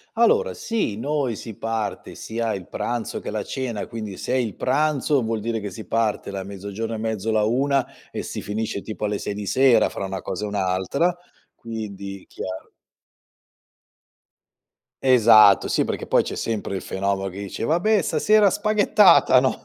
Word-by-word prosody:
Allora, 460 - +3
sì, 225 - -2
noi 140 -2 -1
si 110 +1 -8
parte 115 -1 -4
sia 115 0 -3
il 95 -3 -7
pranzo 120 -2 -3
che - - -5
la 105 0 -3
cena, 125 -6 -4
quindi 110 -4 -6
se - - -4
è - - +2
il 115 -6 -1
pranzo 150 -3 +1
vuol 110 0 -1
dire 115 +1 -2
che 100 -1 -5
si 100 +4 -9
parte 110 -3 -1
da 95 -1 -4
mezzogiorno 100 +3 -5
e - - -3
mezzo, 110 -1 -2
la 110 -1 +2
1, 135 +4 +1 0.2
e - - -5
si - - -5
finisce 105 -1 -3
tipo 110 -1 -6
alle 105 -1 -1
6 100 - -4
di 105 0 -5
sera 130 -1 +4
fra - - -5
una 95 -1 -4
cosa 95 +4 -4
e - - -4
un'altra. 100 - 0 0.4
Quindi, 100 -4 -7
chiaro. 95 +1 -7 2.3
Esatto, 110 -6 +6
sì, - - +1
perché - - -4
poi - - +3
c'è - - -5
sempre 105 -3 -3
il 95 - -5
fenomeno 95 0 -2
che 95 - -10
dice: 100 +2 -5
"Vabbè, 185 - +2
stasera 215 -2 +4
spaghettata, 205 - +5
no" 130 0 -1
110 Hz, 170 wpm, -23 LUFS, 100-130 Hz, 2.3 s, Esatto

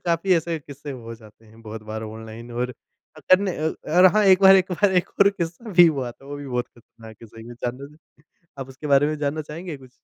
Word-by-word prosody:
काफ़ी 170 +2 +2
ऐसे 165 0 -1
किस्से 145 0 -10
हो 115 -3 -8
जाते 110 0 -18
हैं 110 +1 -19
बहुत 110 0 -8
बार 110 +1 -6
ऑनलाइन 110 +2 -9
और 125 +1 -3 0.6
तब 185 +1 +7
न 200 - -1 0.4
अ, 155 - -2
और 185 +1 +8
हाँ 215 -1 +4
एक 190 0 +5
बार 190 0 +9
एक 185 0 0
बार 195 +2 +2
एक 180 - +1
और 200 - +7
किस्सा 185 +4 -6
भी 175 -1 +7
हुआ 135 -6 -1
था 135 - -18
वो 145 - -7
भी 145 -1 -8
बहुत 125 -1 -2
ख़तरनाक 115 -2 -16
है 115 - -10
सही 115 +1 -13
में। 120 0 -10
जानना 120 +2 -5
चाहेंगे? 150 +2 -14 0.6
आप 135 0 -6
उसके 135 +3 -9
बारे 140 0 +4
में 155 0 -2
जानना 150 +1 -2
चाहेंगे 165 -1 -7
कुछ? 130 -2 -17
140 Hz, 245 wpm, -23 LUFS, 115-170 Hz, 0.6 s, बार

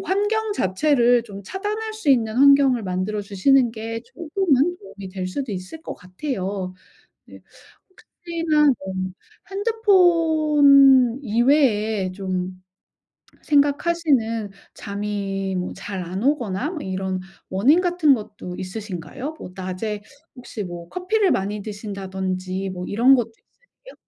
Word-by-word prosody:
환경 415 +4 0
자체를 245 - +2
좀 200 -3 -10
차단할 425 - -4
수 430 -10 0
있는 225 -4 +2
환경을 275 -3 +5
만들어 185 +3 -2
주시는 235 +6 +3
게 225 0 -5
조금은 345 -1 0
도움이 200 - -10
될 185 -1 -4
수도 250 +4 -4
있을 185 +11 -7
것 - - -6
같아요. 185 -2 -5 0.5
네. - - -14 0.5
혹시나 335 -4 -1
뭐 190 0 -6 0.6
핸드폰 315 - +4
이외에 220 -5 +2
좀 185 -1 -4 0.8
생각하시는 285 -7 +1 0.2
잠이 200 -2 -4
뭐 180 0 -3
잘 195 -1 -6
안 185 +5 -5
오거나 260 - 0
뭐 330 - -5
이런 190 0 -3 0.3
원인 255 - +4
같은 350 -5 +3
것도 205 -5 -8
있으신가요? 210 - -6
뭐 180 - -9
낮에 190 +3 -4 0.3
혹시 240 -4 -7
뭐 175 -1 -8
커피를 380 +2 +1
많이 205 +2 -1
드신다든지 190 -2 -4
뭐 180 -1 -6
이런 240 +6 +5
것도 235 -3 -1
있으세요? - - -20
230 Hz, 250 characters per minute, -22 LUFS, 190-305 Hz, 0.8 s, 환경을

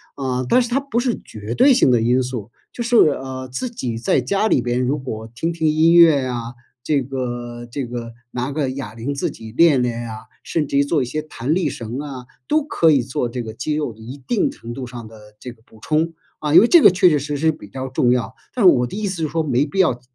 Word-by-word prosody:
啊， 130 -2 -2
但 250 - +4
是 240 - -3
它 255 +3 +1
不 275 -4 -2
是 245 -2 -1
绝 110 +2 -6
对 270 0 +6
性 245 - +4
的 120 -2 +4
因 125 +3 +2
素， 120 -4 -5 0.2
就 240 - -5
是， 240 +1 0
呃， 130 -3 +1
自 130 - -3
己 120 - -4
在 115 - +1
家 200 +2 0
里 - - +2
边 120 0 -1
如 130 +3 0
果 110 -4 -6
听 160 +8 -2
听 165 -1 -1
音 160 +2 +4
乐 160 -6 +6
啊， 120 -1 -4 0.3
这 140 +1 +1
个 120 -2 -5
这 135 -3 -4
个 115 -1 -6 0.2
拿 125 +3 -3
个 140 -2 -1
哑 130 -5 -6
铃 120 +5 -4
自 140 - -2
己 110 -1 -11
练 145 +1 +4
练 120 -1 -2
呀， 110 -2 -7 0.2
甚 155 -3 -1
至 140 - -1
于 140 - +5
做 145 +1 0
一 - - -1
些 150 +5 -4
弹 150 0 -2
力 185 - +1
绳 115 +2 -5
啊， 140 -4 -7 0.2
都 310 0 +2
可 165 - +3
以 140 -4 +4
做 125 0 -2
这 120 +1 -5
个 110 -2 -7
肌 130 +7 -3
肉 150 -7 -2
一 125 +6 -10
定 235 -4 +1
程 115 +1 -9
度 130 -1 -5
上 120 -2 -9
的 110 0 -14 0.2
这 125 - -8
个 110 -2 -20
补 110 - -19
充， 160 +4 0 0.2
啊， 150 -1 -2
因 175 - +9
为 230 - +4
这 340 +4 +6
个 - - +9
确 180 0 +4
确 150 - +2
实 145 +1 -3
实 160 +2 +2
比 150 -9 -12
较 130 +6 -6
重 125 -1 +2
要。 115 -4 -1 0.2
但 245 - -1
是 185 - +9
我 125 -1 +2
的 120 - -7
意 210 0 -2
思 180 -4 -3
是 - - +1
说， 165 +2 0
没 140 -3 +1
必 175 +6 -5
要 145 -10 +3
130 Hz, 275 characters per minute, -20 LUFS, 120-160 Hz, 0.3 s, 因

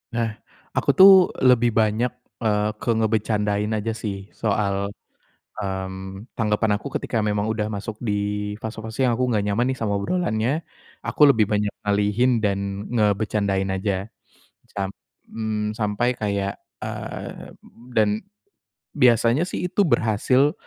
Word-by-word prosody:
Nah, 115 -1 +1 0.4
aku - - -1
tuh 190 +1 +11 0.4
lebih 120 -1 +5
banyak, 110 +2 +2 0.3
eee, 105 -1 +2
ke - - -4
ngebecandain 105 -2 +1
aja 110 +1 -1
sih 105 -3 -6
soal 100 -2 0 0.7
mmm, 95 0 -5
tanggapan 105 -2 +1
aku 105 - -5
ketika 115 -3 -2
memang 105 0 0
udah 110 -1 -1
masuk 105 +1 -4
di 110 -4 -1 0.5
fase-fase 110 +3 -3
yang 120 - +2
aku 125 +2 0
enggak 105 -3 +1
nyaman 105 +4 +1
nih 130 - -3
sama 105 -3 -1
obrolannya, 125 - -1 0.4
aku - - 0
lebih 110 -5 +3
banyak 105 0 0 0.2
ngalihin 105 +4 +2
dan 100 -2 +1 0.3
ngebecandain 100 -3 +1
aja. 95 +2 -2 0.7
Samp 100 -1 -2 0.4
mmm, 110 -1 -2
sampai 120 +4 0
kayak 100 -2 -2 0.2
eee, - - -7 0.4
dan 105 -1 +3 0.8
biasanya 125 +4 +4
sih 180 -1 -3
itu 200 0 +2
berhasil 130 +5 +3
105 Hz, 130 wpm, -23 LUFS, 100-115 Hz, 0.8 s, tuh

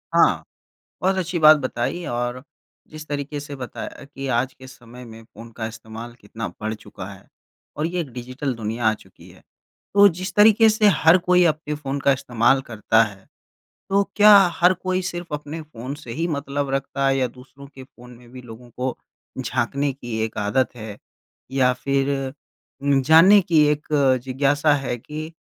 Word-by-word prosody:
हाँ, - - +4 0.6
बहुत 190 +1 +2
अच्छी 180 -1 -2
बात 155 0 +8
बताई 135 +5 -3
और 120 +1 -3 0.5
जिस 155 0 -10
तरीके 145 0 -4
से 145 -1 -8
बताया 130 +2 -8
कि 135 -1 -8
आज 130 +2 -1
के 130 - -14
समय 125 -1 -13
में 115 -1 -12
फ़ोन 115 +1 -13
का 110 -1 -3
इस्तेमाल 115 +1 -9
कितना 110 +2 -6
बढ़ 110 +1 -3
चुका - - -10
है - - -16 0.5
और 150 +2 -1
ये 175 +1 -2
एक 145 -6 -6
डिजिटल 130 +2 -4
दुनिया 115 +1 -4
आ 110 - +5
चुकी - - -18
है, - - -19 0.5
तो 205 0 +8
जिस 185 +2 -6
तरीके 220 +1 +6
से 215 0 +2
हर 160 +3 +5
कोई 180 0 +5
अपने 150 0 -5
फ़ोन 140 -1 -4
का 140 - +3
इस्तेमाल 125 +1 +1
करता 110 -1 +2
है, 100 -3 -5 0.6
तो 200 +1 +3
क्या 210 0 +8 0.2
हर 180 +2 +5
कोई 185 0 -1
सिर्फ़ 175 -3 -5
अपने 150 +2 -6
फ़ोन 135 -2 -8
से 135 -6 -10
ही 165 +7 -2
मतलब 140 -2 -3
रखता 135 0 -2
है 135 - +2
या 130 - +1
दूसरों 135 +3 -15
के 130 - -11
फ़ोन 125 -1 -17
में 120 -1 -18
भी 130 -1 -10
लोगों 120 +1 -13
को 125 +1 -3 0.5
झाँकने 135 +3 -1
की 120 -4 -6
एक 110 - -6
आदत 120 +5 0
है? 110 -2 -8 0.5
या 130 -1 +2
फ़िर 135 +2 -1 0.7
उम, 140 -1 +3
जानने 165 +8 +7
की 165 -4 +3
एक 150 0 -1 0.4
जिज्ञासा 145 +3 +2
है 135 -3 -2
कि 155 +6 -8
135 Hz, 180 wpm, -22 LUFS, 120-155 Hz, 0.7 s, बात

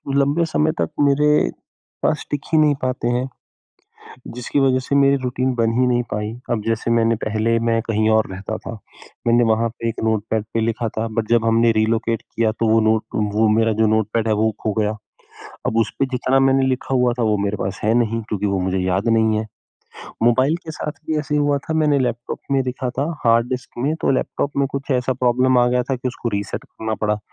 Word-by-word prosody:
लंबे 140 +4 +2
समय 155 -1 +1
तक - - 0
मेरे 145 - +3 0.5
पास 155 - 0
टिक 145 - -1
ही - - +5
नहीं 150 -1 +4
पाते 130 -2 -1
हैं, 125 +2 0 1.1
जिसकी 125 +3 -1
वज़ह 130 -1 +3
से 130 +2 -2
मेरी 140 0 +5
रूटीन 130 +1 -1
बन 115 -1 +1
ही 130 - +4
नहीं 120 0 +1
पाई। 105 +1 -2 0.2
अब 115 -2 0
जैसे 115 +1 0
मैंने 115 0 +3
पहले 110 +2 +1
मैं 115 0 +2
कहीं 110 -1 +1
और 110 0 +3
रहता 95 +1 -5
था, - - -8 0.6
मैंने 120 +1 +4
वहाँ 115 +1 +2
पे 115 0 -5
एक 115 - -5
नोटपैड 110 0 0
पे 115 - +1
लिखा 115 +1 -1
था 110 +1 0
बट 110 0 -2
जब 115 -1 +3
हमने 115 +1 +4
रिलोकेट 110 +1 0
किया 115 -1 -1
तो 115 +1 -1
वो 110 +1 +4
नोट 110 0 +2 0.3
वो 110 +1 +4
मेरा 115 0 +2
जो 110 - +4
नोटपैड 110 +1 0
है 110 - +2
वो 110 +1 +1
खो 110 - -1
गया। 105 0 0 0.7
अब - - -1
उसपे 135 +4 0
जितना 130 +1 +1
मैंने 135 0 +3
लिखा 130 0 -1
हुआ 125 -1 +3
था - - +1
वो 105 -1 +2
मेरे 100 +1 -1
पास 95 0 -3
है 110 - +3
नहीं, 115 -1 0
क्योंकि 105 -2 -3
वो 100 -1 0
मुझे 95 +1 -1
याद 95 +4 0
नहीं 110 -1 +3
है। 110 - -3 0.8
मोबाइल 130 +7 +3
के 160 - -6
साथ 150 - -4
भी 155 -1 0
ऐसे 150 0 -3
ही 150 - +2
हुआ 145 -1 +2
था 160 +3 -5
मैंने 150 -2 +3
लैपटॉप 120 -2 -3
में 135 -1 +3
लिखा 125 0 -3
था 130 +3 -2 0.2
हार्ड 115 +1 +3
डिस्क 130 0 -4
में, 140 +6 0
तो - - 0
लैपटॉप 140 +2 -1
में 140 0 +2
कुछ 140 +1 -5
ऐसा 125 0 +1
प्रॉब्लम 125 0 +2
आ 120 - +4
गया 125 0 +1
था 135 - -2
कि 125 +1 -3
उसको 125 -1 -4
रीसेट 100 0 -4
करना 110 0 -5
पड़ा, 105 0 +1
115 Hz, 220 wpm, -20 LUFS, 110-130 Hz, 1.1 s, ही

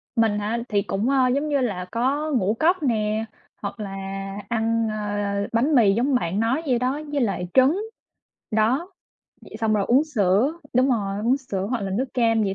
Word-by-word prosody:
Mình 220 -3 +2
hả? 210 +3 -1
Thì 205 -2 +2
cũng, 200 +5 -1
ơ, 265 -2 +3
giống 295 +2 -1
như 285 -1 +2
là, 195 -7 -2
có 280 +6 0
ngũ 215 -7 +1
cốc 345 +1 +2
nè, 220 -3 0 0.4
hoặc 200 +2 -5
là 205 -2 -4 0.6
ăn, 230 0 +1
ơ, 205 -1 -2
bánh 265 +7 +2
mì 215 -6 +5
giống 255 +6 +1
bạn 195 -5 0
nói 235 +7 +1
vậy 250 -3 +2
đó, 260 +4 -1
với 285 -1 0
lại 195 -6 -1
trứng, 275 +9 +4 0.7
đó, 245 - +1 0.5
vậy - - -10
xong 220 -1 +2
rồi 205 -2 +1
uống 265 +5 +4
sữa 220 -2 +2 0.2
đúng 255 +2 +4
rồi, 200 -5 -1
uống 250 +3 +3
sữa 200 -8 -4
hoặc 250 -2 -1
là 195 -1 -3
nước 215 +8 0
cam 225 -3 +2
vậy 195 -2 -1
230 Hz, 195 wpm, -23 LUFS, 205-265 Hz, 0.7 s, mì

